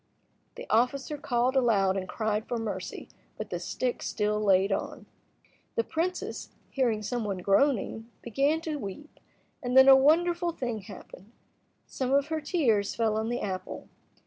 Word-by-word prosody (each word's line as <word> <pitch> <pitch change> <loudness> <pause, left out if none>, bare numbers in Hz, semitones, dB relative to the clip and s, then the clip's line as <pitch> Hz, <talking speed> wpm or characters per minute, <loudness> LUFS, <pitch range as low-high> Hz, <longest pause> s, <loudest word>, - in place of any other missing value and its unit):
The - - -8
officer 250 +6 +1
called 255 -3 0
aloud 205 -7 +3
and 185 -2 -4
cried 215 -1 -2
for 240 - -2
mercy, 225 -2 -5 0.3
but - - -6
the - - -2
stick 250 -1 -3
still 210 0 -1
laid 195 0 +3
on. - - -3 0.7
The 230 - +2
princess, 345 +8 -3 0.2
hearing 235 -6 0
some 240 +2 -2
one 200 -3 -2
groaning, 225 +3 +1
began 280 +7 +1
to 315 -2 -3
weep, 270 +5 -8 0.4
and 250 -1 0
then 265 0 +9
a 270 - +10
wonderful 340 +5 +3
thing 240 -7 -3
happened. 195 +1 -12 0.5
Some 260 -1 -3
of 280 +2 +2
her 315 -1 -2
tears 250 - +1
fell 225 -2 +1
on 220 +1 -1
the 240 +1 -2
apple. 185 -2 -5
240 Hz, 155 wpm, -28 LUFS, 210-280 Hz, 0.7 s, a